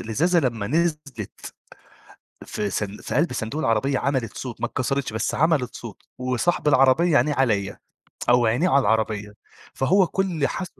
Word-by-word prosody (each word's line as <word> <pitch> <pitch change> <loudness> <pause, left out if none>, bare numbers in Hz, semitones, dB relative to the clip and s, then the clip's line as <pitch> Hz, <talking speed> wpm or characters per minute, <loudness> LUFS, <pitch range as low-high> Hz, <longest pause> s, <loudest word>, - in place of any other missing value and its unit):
الإزازة 165 +11 +1
لمّا 115 -7 -2
نزلِت 150 - -3 0.9
في 105 -1 -3
صن 100 +1 -3
في - - -6
قلب 160 +1 +2
صندوق 125 +5 -3
العربية 130 +2 +1
عملت 130 -6 -2
صوت، 125 -3 -7
ما - - 0
اتكسرتش، 135 -1 -2
بس 110 - -2
عملت 150 -6 +1
صوت 115 -3 -10 0.2
وصاحب 130 +6 0
العربية 145 +4 +4
عينيه 150 +1 +2
عليَّ 105 -7 0 0.5
أو 120 -1 +4
عينيه 125 +11 +2
على 140 -4 +4
العربية، 110 -3 -1 0.4
فهو 185 +8 +3
كل 175 -6 -1
حس 185 - -4
130 Hz, 150 wpm, -23 LUFS, 110-155 Hz, 0.9 s, العربية